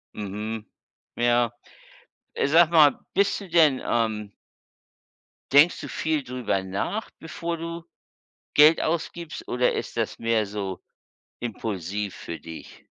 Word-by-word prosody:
Mhm. 105 +2 -5 0.5
Ja. 120 0 +2 0.8
Äh, - - 0
sage 165 +3 +5
mal, 155 -4 +6 0.2
bist 200 0 +2
du 195 - -10
denn, 155 -6 +4
ähm 110 -3 -1 1.2
denkst 145 +5 +6
du - - -6
viel 155 -3 -1
drüber 125 -7 -2
nach, 100 - -3
bevor 170 +1 -4
du 170 0 -6 0.7
Geld 150 +2 +7
ausgibst? 170 0 -3
Oder 125 0 +2
ist - - -5
das - - -2
mehr 115 -1 +1
so 100 -2 -5 0.6
impulsiv 105 -3 -4
für 85 - -7
dich? 80 +1 -11
120 Hz, 120 wpm, -25 LUFS, 105-160 Hz, 1.2 s, Geld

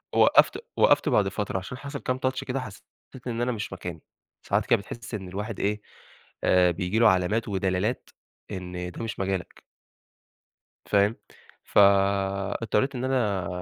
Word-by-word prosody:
وقّفت - - +5 0.2
وقّفت - - +4
بعد 100 -2 +3
فترة، 100 -1 -3
عشان 95 +7 -8
حصل 140 +1 -6
كام 130 0 -2
touch 130 0 0
كده، 135 +1 -2
حسيت 115 -6 -9 0.4
إن 120 -1 -2
أنا 125 +1 +1
مش 110 -4 -4
مكاني، 90 -4 -7 0.5
ساعات - - +1
كده - - +3
بتحس 120 +4 -9
إن 95 -3 -4
الواحد 105 +3 -5
إيه، 105 +1 0 0.6
آآ 90 -1 +4
بييجي 95 +4 -1
له 115 - +7
علامات 95 +5 +1
ودلالات 95 +3 -1 0.4
إن 90 -1 -5
ده 100 - -7
مش 115 - -5
مجالك. 95 -2 -3 1.2
فاهم؟ 100 +2 +3 0.5
فاضطريت 100 +5 +2
إن 125 - -3
أنا 110 -9 0
100 Hz, 145 wpm, -26 LUFS, 95-115 Hz, 1.2 s, له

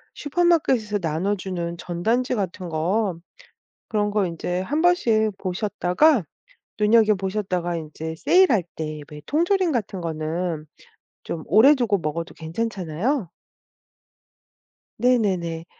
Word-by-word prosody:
슈퍼마켓에서 290 - +1
나눠주는 175 +1 -2
전단지 220 +10 -1
같은 185 -3 -4
거 175 +3 0 0.7
그런 210 -1 0
거 205 -2 +1
인제 175 +2 -3
한번씩 230 - +2
보셨다가 200 - +2 0.6
눈여겨 215 0 +5
보셨다가 185 -3 -2
인제 160 +1 -6
세일할 310 - +4
때 155 -1 -5
왜 150 0 -9
통조림 350 +3 +2
같은 200 -7 -2
거는 160 0 -3 0.6
좀 160 -2 -5
오래 230 - +7
두고 225 -7 +1
먹어도 165 +2 -4
괜찮잖아요? 185 - -2 1.7
네 250 +2 +3
네 200 -4 +2
네. 165 -1 -5
195 Hz, 245 characters per minute, -23 LUFS, 170-230 Hz, 1.7 s, 오래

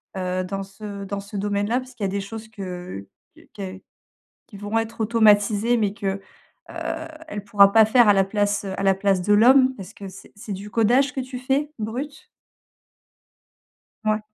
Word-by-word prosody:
heu, 185 0 -2
dans 195 +2 -4
ce 200 0 -8
dans 200 +1 -4
ce 200 +1 -8
domaine-là, 205 +4 0
puisqu'il 255 -4 -9
y - - +2
a - - +2
des 200 +1 -2
choses 220 +2 -8
que 180 - -7 0.3
qu - - -19
que 190 -1 -7 0.7
qui 205 - -12
vont 205 +3 -1
être 225 0 -5
automatisées 215 +1 +3
mais 205 -3 0
que, 195 -1 -3 0.5
heu, - - -12 0.5
elle 205 -10 -6
pourra 200 -2 +5
pas 220 +1 +7
faire 220 0 +5
à - - +7
la 195 -1 +4
place, 205 0 0
heu, 190 - -4
à - - -2
la 195 -1 +4
place 195 -1 +1
de 205 +3 +2
l'homme. 260 +5 +6
Est-ce 195 +2 -9
que 200 - -8
c'est 190 +1 -14
c'est 205 0 -7
du 200 +2 -7
codage 245 +5 +3
que - - -3
tu 255 0 -7
fais, 275 +4 0
brut? 275 - -5 1.8
Ouais. 215 0 +1
205 Hz, 190 wpm, -23 LUFS, 195-225 Hz, 1.8 s, pas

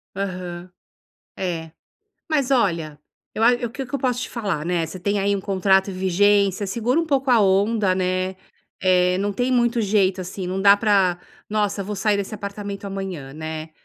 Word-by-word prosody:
Aham, 180 -2 -5 0.6
é. 165 -4 -4 0.6
Mas 280 -4 +1
olha, 170 - +1 0.4
eu 220 - -2
a 235 +2 +6
o - - -7
que 270 +3 -5
que 275 +2 -9
eu - - +1
posso 250 -1 0
te - - -6
falar, 195 -10 -3
né? 170 -1 0
Você 185 - -9
tem 200 +2 0
aí 200 +1 +1
um 200 - -2
contrato 195 0 +2
em - - -7
vigência 200 +2 +2
segura 235 +7 0
um 330 - -3
pouco 270 -3 +1
a 235 - +5
onda, 200 0 +2
né? 185 0 -1 0.4
Eh, 180 0 +3
não 205 +1 -1
tem 245 +5 -1
muito 240 -1 +2
jeito 195 -2 +2
assim 185 +1 -5
não 185 +2 -2
dá 200 0 +7
pra: 195 -4 +2 0.3
"Nossa, 205 -1 0
vou 205 +2 -5
sair 210 0 +1
desse 200 +1 -4
apartamento 200 0 -6
amanhã, 190 -8 -5
né? 155 +1 -6
195 Hz, 185 wpm, -22 LUFS, 185-215 Hz, 0.6 s, dá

